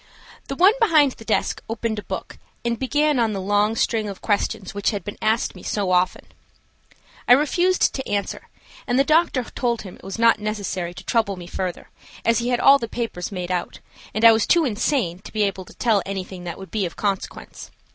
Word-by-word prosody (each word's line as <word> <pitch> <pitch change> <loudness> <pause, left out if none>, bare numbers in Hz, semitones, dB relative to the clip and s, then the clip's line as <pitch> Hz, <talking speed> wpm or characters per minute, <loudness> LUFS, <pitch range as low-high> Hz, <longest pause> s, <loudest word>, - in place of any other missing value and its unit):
The 275 - -4
one 375 +7 +6
behind 310 - +5
the 225 - -12
desk 220 - 0
opened 225 -1 -2
a - - -8
book - - -6 0.3
and 235 -1 -1
began 290 +1 +1
on 225 -2 +1
the 195 - -3
long 205 +3 +1
string 220 -2 0
of 195 - -7
questions 205 -2 -1
which 200 0 0
had 205 -2 -3
been 205 - -7
asked 220 +2 +1
me - - -12
so 200 -3 -1
often. 180 0 +1 1.0
I 245 - +8
refused 350 +7 +3
to 265 - -5
answer, 205 -1 -3 0.4
and 245 -1 +1
the 275 - +5
doctor 310 -3 +2
told 235 0 -2
him 190 -3 -10
it - - -21
was 195 +2 -6
not 230 -1 +4
necessary 200 -5 -3
to - - -9
trouble 220 -4 0
me 180 -1 -9
further, 180 0 -5 0.3
as 230 +1 +3
he 240 +1 -1
had 245 -1 +1
all 275 +1 +7
the 230 - -4
papers 225 -8 -4
made 180 -2 -4
out, 180 -1 -3 0.3
and 215 +2 +1
I 230 - +11
was 220 -1 +2
too 340 -2 +4
insane 215 - 0
to - - -12
be 215 -1 +1
able 195 -2 -2
to - - -15
tell 220 -5 +2
anything 190 -2 -6
that 170 - -5
would 190 -1 -10
be 205 -4 0
of 170 - -11
consequence. 200 -2 -4
215 Hz, 215 wpm, -22 LUFS, 195-245 Hz, 1.0 s, I